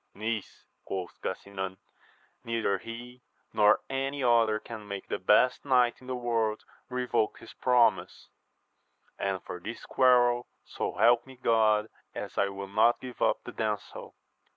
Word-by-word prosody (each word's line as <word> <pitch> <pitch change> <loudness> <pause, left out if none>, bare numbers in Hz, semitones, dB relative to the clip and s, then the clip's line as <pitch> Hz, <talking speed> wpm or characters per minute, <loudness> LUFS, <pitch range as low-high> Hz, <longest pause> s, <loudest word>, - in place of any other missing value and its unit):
Niece, 110 0 -4 0.2
quoth 95 -2 -6
Gasinan, 95 0 -5 0.7
neither 115 -4 0
he 120 +4 -9 0.3
nor 105 -1 +5
any 135 +1 -2
other 115 -3 +4
can 110 -1 -9
make 100 -1 -6
the - - -3
best 105 +7 +3
knight 125 -3 +2
in 130 - -14
the 130 - -2
world 115 -3 -1 0.3
revoke 125 -3 0
his - - -13
promise; 125 -2 +2 0.9
and 95 -2 -2
for 90 - -7
this 115 +7 -7
quarrel, 120 -2 +4 0.2
so - - -4
help 120 +2 +4
me 130 - -12
God, 110 -3 +3 0.3
as - - -6
I 100 - +2
will 100 0 -6
not 110 +4 +3
give 125 -2 -9
up - - +2
the - - -8
damsel 105 -2 -4
115 Hz, 145 wpm, -29 LUFS, 105-125 Hz, 0.9 s, nor